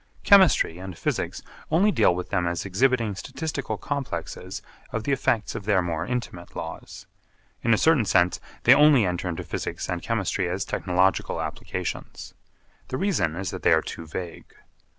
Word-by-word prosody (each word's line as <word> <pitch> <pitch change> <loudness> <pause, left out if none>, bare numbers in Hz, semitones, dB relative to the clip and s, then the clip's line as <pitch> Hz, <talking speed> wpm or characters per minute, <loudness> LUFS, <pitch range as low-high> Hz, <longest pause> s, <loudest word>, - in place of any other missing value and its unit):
Chemistry 190 - +5
and 95 -2 -8
Physics - - -2 0.3
only 185 +7 +4
deal 90 - +3
with 90 - -5
them 90 -3 +1
as 85 0 -2
exhibiting 115 +2 +1
statistical 145 - -4
complexes 135 - -5 0.3
of 110 - -3
the 140 - -1
effects 125 -5 0
of 100 - -6
their 100 -3 +3
more 85 -2 -2
intimate 120 -8 -5
laws. - - -7 0.6
In 115 - +1
a 110 - +5
certain 160 -5 +4
sense, 90 -2 +3 0.2
they 125 - +8
only 145 -5 +6
enter 90 0 -2
into 85 - -4
Physics - - -4
and - - -3
Chemistry 90 - -1
as 95 +2 -2
technological 95 +1 +1
applications. - - -5 0.5
The 130 - -3
reason 180 - 0
is 95 +2 -3
that - - -6
they - - +4
are - - +3
too 80 - -7
vague. 85 +2 -7
100 Hz, 165 wpm, -25 LUFS, 90-135 Hz, 0.6 s, they